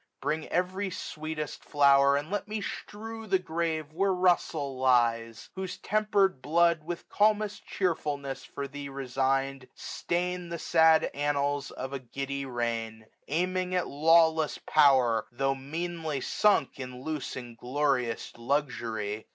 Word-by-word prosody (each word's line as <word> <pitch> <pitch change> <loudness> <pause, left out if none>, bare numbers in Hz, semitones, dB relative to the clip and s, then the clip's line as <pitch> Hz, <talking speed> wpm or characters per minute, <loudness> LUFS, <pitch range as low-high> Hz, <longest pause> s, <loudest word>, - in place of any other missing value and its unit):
1520 - - -12
Bring 155 0 -2
every 185 +3 0
sweetest 155 -4 -5
flower, 140 -1 +5
and 145 +5 -3
let 205 0 -2
me 215 0 -3
strew 225 +2 -7
The 195 -1 +3
grave 160 -3 -3
where 195 +4 +2
Russel 160 -7 +1
lies 115 -3 +2
j - - -17
whose 190 -1 -5
tempered 205 -7 +1
blood. 170 +2 +3
With 170 +2 -6
calmest 210 0 +1
cheerfulness 145 -7 -2
for 140 0 -6
thee 140 +1 -7
resigned, 135 0 -1
Stain'd 180 0 -3
the 170 - -2
sad 160 -1 +4
annals 145 0 0
of 130 +2 -6
a 140 - -3
giddy 135 +2 -4
reign 115 -3 -3
j 110 - -22 0.2
Aiming 180 +3 0
at 180 - 0
lawless 160 +1 +4
power, 130 -7 +4
tho* 135 +3 0
meanly 160 +2 -4
sunk 205 +1 +3
1525 125 -2 -8
In 125 - -11
loose 155 -3 -3
inglorious 125 0 -1
luxury. 115 -5 -2
145 Hz, 140 wpm, -29 LUFS, 130-175 Hz, 0.2 s, flower